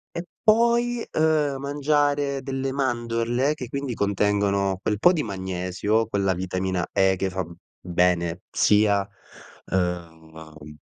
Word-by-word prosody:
e 170 - -3 0.2
poi, 235 +2 +3
uhm, 155 -3 +2
mangiare 145 0 0
delle 135 0 -3
mandorle 120 0 0
che 130 -5 -7
quindi 140 -1 -3
contengono 100 -2 +1
quel 105 0 -1
po' 175 - +5
di 160 - 0
magnesio, 95 +2 -1
quella 100 -3 0
vitamina 95 0 -2
E 95 0 +3
che 95 +1 -2
fa 95 0 -3
b 85 0 -11 0.3
bene, 90 -1 0
sia, 105 -2 +3 0.6
ehm 80 -4 -5
105 Hz, 120 wpm, -24 LUFS, 90-140 Hz, 0.6 s, po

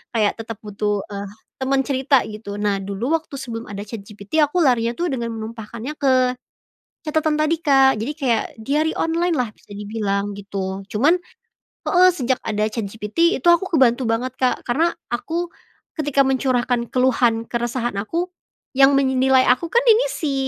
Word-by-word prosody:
kayak 210 -2 +2
tetap 225 0 -6
butuh, 205 -1 -2
eee, 200 0 -5 0.3
teman 270 +1 +2
cerita 270 -1 +2
gitu 210 -1 -7
nah 205 -1 0
dulu 200 +9 -2
waktu 310 -3 -12
sebelum 235 -3 -6
ada 200 0 -5
ChatGPT 210 +5 -5
aku 295 +5 +1
larinya 235 -4 +2
tuh 350 - 0
dengan 235 -2 -2
menumpahkannya 225 +4 -6
ke 275 -2 +3 1.0
catatan 310 0 +1
tadi, 310 +2 +2
Kak, 270 - +4
Jadi 255 +7 -2
kayak 245 -7 +1 0.2
diary 300 +7 0
online 335 +1 0
lah 240 -4 -1
bisa 215 - -28
dibilang 205 -1 -2
gitu 195 -1 -5
cuman 290 +12 +3 0.7
heeh, 365 0 +6
sejak 260 -5 -1
ada 215 -1 -1
ChatGPT 220 - 0
itu 270 - -10
aku 360 +2 +4
kebantu 260 -5 +3
banget, 240 +3 -1
Kak, 255 -1 0
karena 315 +8 +2 0.2
aku, 335 +8 -2 0.5
ketika 290 -3 0
mencurahkan 250 -2 0
keluhan 240 -3 +2
keresahan 240 -1 -2
aku, 330 - -2 0.5
yang 275 +1 +6
menilai 265 -1 +3
aku 250 +7 +3
kan 475 - +5
ini 460 +2 +6
si, 290 -4 -2
250 Hz, 155 wpm, -21 LUFS, 215-290 Hz, 1.0 s, heeh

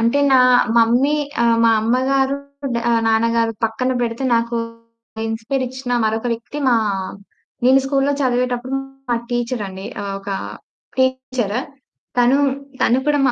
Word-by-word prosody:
అంటే, 235 +5 +2
నా - - +7 0.4
మమ్మీ 245 +6 +4 0.3
ఆహ్, 230 -1 +4
మా 230 - +6
అమ్మగారు, 265 +4 +1 0.4
డ - - +1 0.3
నాన్నగారు 230 0 +2
పక్కన 250 +4 0
బెడితే 235 +2 -2
నాకు 235 +1 0 0.7
ఇన్‌స్పైరిచ్చిన 250 +3 -3
మరొక 220 +2 -1
వ్యక్తి 230 +6 -6
మా 240 - +4 0.9
నేను 260 +2 +6
స్కూల్లో 275 +1 +1
చదివేటప్పుడు 250 0 0 0.4
మా 240 - +2
టీచరండి. 225 -6 -3 0.2
ఆహ్, 200 -1 -4
ఒకా 195 0 -4 0.6
టీచర్. 260 -4 0 0.6
తనూ, 250 +3 +4 0.4
తను 250 +3 +3
కూడా 290 -1 +3
245 Hz, 115 wpm, -19 LUFS, 230-260 Hz, 0.9 s, నా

